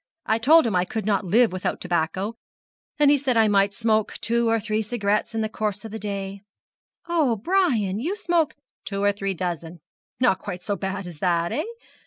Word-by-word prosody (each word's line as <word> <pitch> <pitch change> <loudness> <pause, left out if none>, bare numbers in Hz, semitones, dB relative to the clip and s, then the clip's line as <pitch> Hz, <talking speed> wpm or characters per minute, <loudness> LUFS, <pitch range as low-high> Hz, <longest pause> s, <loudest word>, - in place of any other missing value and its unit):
I 220 +1 +1
told 310 +6 +6
him 220 -5 0
I 180 - +3
could 210 +3 -4
not 205 -2 +1
live 225 +5 +4
without 185 0 -2
tobacco, 180 +4 -1 0.6
and 290 -1 +5
he 290 - +4
said 260 -3 0
I 220 -1 +5
might 200 -1 +3
smoke 220 0 +1
two 235 0 +1
or 225 0 +2
three 215 0 -1
cigarettes 215 0 -1
in 225 - 0
the 220 - 0
course 215 -2 -3
of 220 - -7
the 220 - -5
day 200 -1 -4 0.3
' - - -44
'Oh, 315 -9 +2
Brian, 335 - +2
and 195 +4 -3
you 350 +9 -1
smoke 340 -7 0
' - - -69
'Two 200 -1 -3
or 205 - +4
three 195 -1 -3
dozen! 170 -1 -4 0.4
Not 240 -7 +3
quite 180 0 -6
so 205 - -1
bad 190 0 -4
as 170 -4 -9
that, 170 -1 +1
eh? 305 - -1
215 Hz, 215 wpm, -24 LUFS, 195-235 Hz, 0.6 s, told